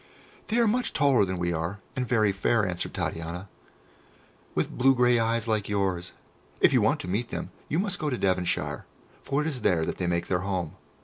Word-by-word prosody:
"They 225 - 0
are 235 - +5
much 245 +3 0
taller 135 -7 +4
than 95 -1 -3
we 85 0 0
are, 85 +5 -2 0.2
and 125 -1 -1
very 110 -4 +3
fair," 105 +3 +1
answered 90 -1 -3
Titania, 85 +4 -4 1.1
"with - - 0
blue 135 +1 +4
grey 125 -1 +4
eyes 115 0 0
like 110 -3 0
yours. 95 -4 -1 0.5
If - - +5
you - - +5
want - - +2
to - - -7
meet 105 +6 -1
them, - - -5 0.2
you 155 - 0
must 190 0 0
go 150 - -1
to 125 - -1
Devonshire, 90 -3 0 0.4
for 140 +2 0
it 150 - -1
is 135 -6 -3
there 85 -6 +2
that - - -3
they 90 - -1
make 85 0 0
their 90 - 0
home. 90 -4 -3
105 Hz, 205 wpm, -27 LUFS, 90-125 Hz, 1.1 s, are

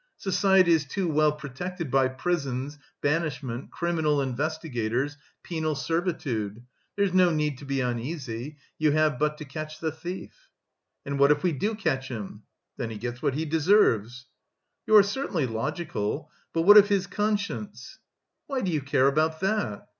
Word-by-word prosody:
Society 190 -2 +3
is 160 -3 +4
too 180 +6 -2
well 155 -1 +3
protected 150 +2 -6
by 135 -1 +4
prisons, 140 -1 -2 0.2
banishment, 145 -5 -2
criminal 160 -4 0
investigators, 135 -2 -2 0.3
penal 160 -3 -2
servitude. 145 - -2 0.3
There's 200 -2 +1
no 185 -1 +5
need 150 -4 -1
to 145 - -10
be 135 -1 -1
uneasy. 125 +2 -4 0.2
You 155 -2 +3
have 155 -3 +2
but 150 0 +1
to 150 - -8
catch 155 +2 -7
the 160 -1 -1
thief." 180 - -8 0.6
"And 140 0 -3
what 140 0 +6
if 150 0 +3
we 180 - +3
do 205 +10 -1
catch 145 -10 -1
him?" 110 -6 -7 0.4
"Then 115 - -3
he 110 - -6
gets 120 +3 -5
what 135 - 0
he 160 +2 -1
deserves." 145 - +2 0.6
"You 215 - +5
are 210 - +10
certainly 200 - -1
logical. 130 +1 -3 0.2
But 165 - 0
what 205 +4 +9
of 205 0 +8
his 195 -2 +2
conscience?" 205 0 -3 0.5
"Why 270 -2 -2
do 185 - -1
you 155 -3 0
care 135 -1 +2
about 155 +3 +2
that?" 195 - -1
150 Hz, 160 wpm, -27 LUFS, 135-175 Hz, 0.6 s, are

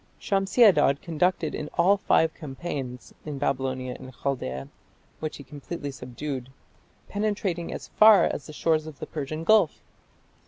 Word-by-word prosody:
Shamshi 195 +4 +2
Adad 150 -9 +5
conducted 165 -1 0
in 150 - -4
all 185 +4 +5
five 160 -4 +2
campaigns 135 -4 -6
in 150 -2 -5
Babylonia 130 -2 -2
and 130 - -10
Chaldaea, 70 - -3 0.5
which 155 -1 -4
he 140 - -10
completely 145 +2 -6
subdued, 130 0 -6 0.6
penetrating 200 -5 -2
as - - -7
far 215 -1 +7
as 135 - -2
the - - -8
shores 155 0 +1
of 155 -3 -9
the - - -6
Persian 155 +1 -5
Gulf. 215 -3 +3
150 Hz, 145 wpm, -26 LUFS, 135-175 Hz, 0.6 s, far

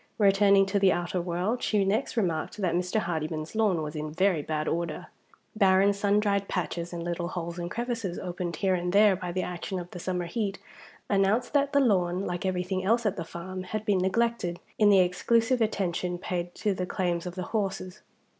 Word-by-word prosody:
Returning 200 -1 +5
to 195 +1 0
the 195 -1 +5
outer 175 +1 -1
world, 180 +7 -1
she 205 -2 +1
next 220 +6 -1
remarked 170 -6 -1
that 185 -5 0
Mr. 180 +4 0
Hardyman's 155 -2 -3
lawn 205 -7 +2
was 150 +1 -5
in 150 0 -4
very 180 0 +2
bad 155 +1 -2
order. 170 -2 -3 0.5
Barren 195 0 +4
sun 200 +1 +2
dried 200 -2 0
patches, 175 -1 -3
and 170 -1 -5
little 175 0 -2
holes 170 -1 -5
and 175 0 -3
crevices 230 -5 -3
opened 175 -2 -4
here 190 +3 +1
and 180 0 -1
there 205 -1 +6
by 180 -1 -5
the 185 +1 -1
action 180 +2 -4
of 175 -1 -6
the 180 - -7
summer 180 0 -2
heat, 200 +2 -2 0.5
announced 205 +6 +1
that 285 -1 +2
the 280 - +4
lawn, 190 -7 +2
like 175 +2 -2
everything 185 0 -1
else 230 +4 +2
at 205 -1 +1
the 175 - -4
farm, 185 +3 -7
had 210 +3 -4
been 205 -4 +2
neglected, 190 -2 0 0.2
in 210 -1 +6
the 200 - +6
exclusive 230 +7 +2
attention 180 -4 -1
paid 175 0 -4
to 210 - 0
the 180 -1 -3
claims 175 -2 -1
of 180 - -6
the 185 - -3
horses. 195 -2 -2
185 Hz, 200 wpm, -28 LUFS, 175-205 Hz, 0.5 s, there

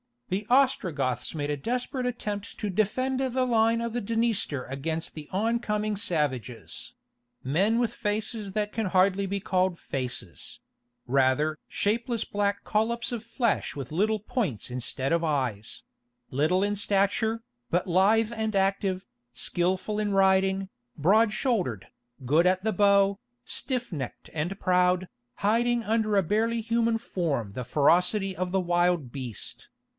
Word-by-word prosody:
The 200 +3 -2
Ostrogoths 165 - +1
made 145 -1 -2
a 145 - -1
desperate 250 - -2
attempt 210 -4 -4
to 210 - -2
defend 255 +7 0
the 260 -1 +1
line 230 -1 +3
of 235 0 -2
the 245 - 0
Dniester 225 - 0
against 160 +5 -4
the 150 -2 -8
oncoming 215 0 0
savages—"men 130 - -2
with 240 -1 +1
faces 210 -1 -2
that 210 0 -1
can 225 -3 -1
hardly 190 +2 +3
be 200 +1 -2
called 185 -2 +1
faces—rather 130 +2 -2
shapeless 230 +2 0
black 200 0 -1
collops 230 +3 0
of 235 -2 -4
flesh 230 -1 0
with 135 -2 -6
little 215 +6 +1
points 205 - -2
instead 125 +2 -2
of 170 0 +3
eyes; 130 -9 -2 0.5
little 155 +8 +2
in 205 0 0
stature, 205 +3 +1 0.3
but 175 +1 +1
lithe 210 +5 +3
and 220 -1 -2
active, 195 -1 +1 0.3
skilful 185 +4 0
in 205 -1 0
riding, 190 0 +3 0.3
broad 210 +8 +4
shouldered, 190 - -1 0.4
good 155 +7 +4
at 185 +1 +2
the 220 0 +1
bow, 200 0 +4 0.2
stiff 250 -2 -1
necked 140 -7 -6
and 170 +5 -3
proud, 180 0 +2 0.4
hiding 235 +2 +2
under 220 -1 +1
a 195 - +4
barely 225 +6 +1
human 230 0 +1
form 155 - -2
the 125 +4 -5
ferocity 180 - +3
of 185 -1 -2
the 190 0 +2
wild 175 -6 +1
beast." 125 -6 -6
195 Hz, 135 wpm, -27 LUFS, 160-220 Hz, 0.5 s, broad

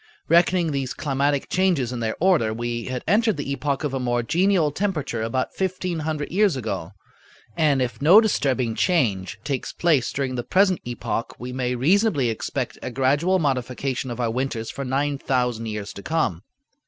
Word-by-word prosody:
Reckoning 170 0 +3
these 135 -2 -2
climatic 140 -1 0
changes 175 -10 +1
in 120 - -4
their 110 -1 -2
order, 160 -12 +3
we 120 0 -3
had 130 -1 -4
entered 215 +2 +3
the 140 -1 -3
epoch 140 +1 -2
of 145 -3 -2
a 135 - -1
more 120 -1 0
genial 175 - +2
temperature 155 - -2
about 115 +3 -2
fifteen 185 -2 -2
hundred 155 -1 -3
years 195 -2 +3
ago; 100 -7 -4 0.6
and 145 -4 +3
if 120 +1 -5
no 170 +9 +8
disturbing 130 - +1
change 110 - 0
takes 135 -3 -3
place 155 -8 +1
during 135 -2 -2
the 120 -1 -3
present 190 +3 +3
epoch, 120 -1 -3
we 125 +1 -6
may 125 -1 -1
reasonably 150 - +2
expect 110 - -4
a - - -4
gradual 140 +9 +2
modification 130 -3 -1
of 120 - -5
our 115 -2 0
winters 120 -2 -3
for 140 - -5
nine 140 +2 -1
thousand 125 -4 -1
years 105 -2 -5
to - - -9
come. 130 - -1
135 Hz, 175 wpm, -23 LUFS, 120-165 Hz, 0.6 s, no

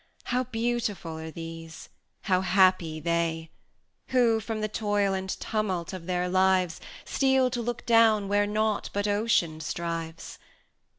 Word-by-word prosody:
How 255 +1 -1
beautiful 225 -8 -2
are 160 0 -6
these! 165 0 -9 0.3
how 185 -2 +2
happy 185 -4 +3
they, 165 -1 -1 0.6
Who, 240 -3 +3
from 220 0 -4
the 215 - 0
toil 205 -2 0
and 190 0 -3
tumult 190 -5 -2
of 180 -2 -7
their 180 0 0
lives, 185 -2 +2 0.2
Steal 265 -2 +2
to 240 - -2
look 240 +1 -4
down 225 -3 +4
where 205 +1 +2
nought 215 0 0
but 205 +1 0
Ocean 205 -7 +1
strives! 165 0 -5
195 Hz, 135 wpm, -27 LUFS, 170-220 Hz, 0.6 s, down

